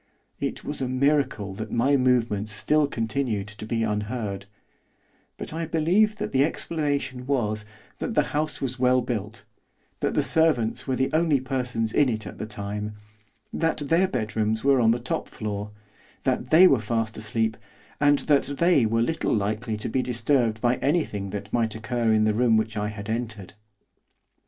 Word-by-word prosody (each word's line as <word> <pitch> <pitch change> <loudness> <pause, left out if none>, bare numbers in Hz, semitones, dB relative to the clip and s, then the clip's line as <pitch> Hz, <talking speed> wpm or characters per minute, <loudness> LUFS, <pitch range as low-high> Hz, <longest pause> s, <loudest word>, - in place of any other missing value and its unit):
It - - -3
was 145 - -4
a 130 - 0
miracle 130 -7 +1
that 110 +3 -6
my 130 +5 +3
movements 120 -5 +1
still 145 +8 +2
continued 115 -4 -2
to 105 +1 -9
be 115 0 0
unheard, 105 -2 -3 0.9
but - - -6
I 165 0 -3
believe 180 +7 +2
that - - -4
the 135 +1 +4
explanation 140 -5 -2
was, 110 -6 0 0.3
that - - -3
the - - +4
house 150 +1 -1
was 130 -2 -3
well 125 0 +4
built; 115 -2 -5 0.5
that - - -1
the - - +3
servants 155 -10 +2
were 130 - +1
the 130 +1 0
only 160 -3 +3
persons 125 -4 -2
in 145 -3 +4
it 110 -2 -3
at - - -9
the 110 - -4
time; 105 0 -5 0.6
that 165 -1 0
their 175 +3 +4
bedrooms 110 -4 -1
were 135 -2 +4
on 115 - +4
the 115 - +3
top 120 - -3
floor; 105 -1 -5 0.5
that 125 -1 -1
they 170 +6 +8
were 135 -8 +4
fast 110 0 -2
asleep; 110 0 -1 0.4
and 145 -1 +4
that 140 -1 +2
they 170 -9 +4
were 115 +1 +1
little 160 0 0
likely 110 +2 -2
to 105 - -5
be 130 +3 0
disturbed 120 -2 +1
by 120 0 +2
anything 135 - -1
that 100 +1 -6
might 115 -2 +1
occur 115 0 0
in 110 0 +3
the 110 0 +2
room 115 0 +3
which 110 0 -1
I 105 0 -1
had 105 -1 -7
entered. 110 -4 -4
120 Hz, 175 wpm, -25 LUFS, 110-140 Hz, 0.9 s, they